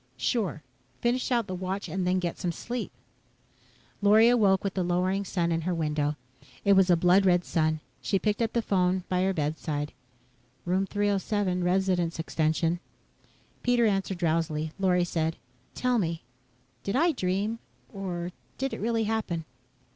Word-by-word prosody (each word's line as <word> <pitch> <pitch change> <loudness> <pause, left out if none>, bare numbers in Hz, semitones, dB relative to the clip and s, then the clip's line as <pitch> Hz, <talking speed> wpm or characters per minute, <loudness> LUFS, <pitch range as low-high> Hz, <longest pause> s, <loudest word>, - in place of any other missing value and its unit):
"Sure 175 - -1 0.4
finish 245 +2 0
out 235 -3 +2
the 185 - -5
watch 185 +2 -3
and 190 -1 -2
then 185 +1 +2
get 175 -2 -1
some 175 - -1
sleep." 240 +8 -5 1.1
Lorry 215 +3 +6
awoke 205 -6 +4
with 200 -1 -1
the 190 - -1
lowering 180 +3 +1
sun 175 -3 -1
in 165 0 0
her 180 +2 -1
window. 150 -2 0 0.5
It 200 - +6
was 190 -1 +5
a 175 - +7
blood 180 +3 +4
red 180 -2 +3
sun. 155 -1 0 0.2
She 195 - +1
picked 210 +3 0
up 230 0 0
the 235 - +1
phone 185 -2 +1
by 180 0 +1
her 190 +1 +2
bedside. 150 -2 -2 0.7
"Room 185 +2 +1
307 205 -2 0
Resident's 180 -2 +1
extension." 160 +1 0 0.8
Pete 245 0 +2
answered 195 -4 +1
drowsily. 160 -2 0
Lorry 180 -2 +3
said, 165 -1 -1 0.4
"Tell 250 -1 +1
me 165 - -2 0.6
did 200 - -2
I 335 +6 +4
dream, 205 - -1 0.3
or 180 -3 -4 0.3
did 270 0 -2
it - - -5
really 225 +1 +1
happen." 210 -7 -2
185 Hz, 155 wpm, -28 LUFS, 170-205 Hz, 1.1 s, a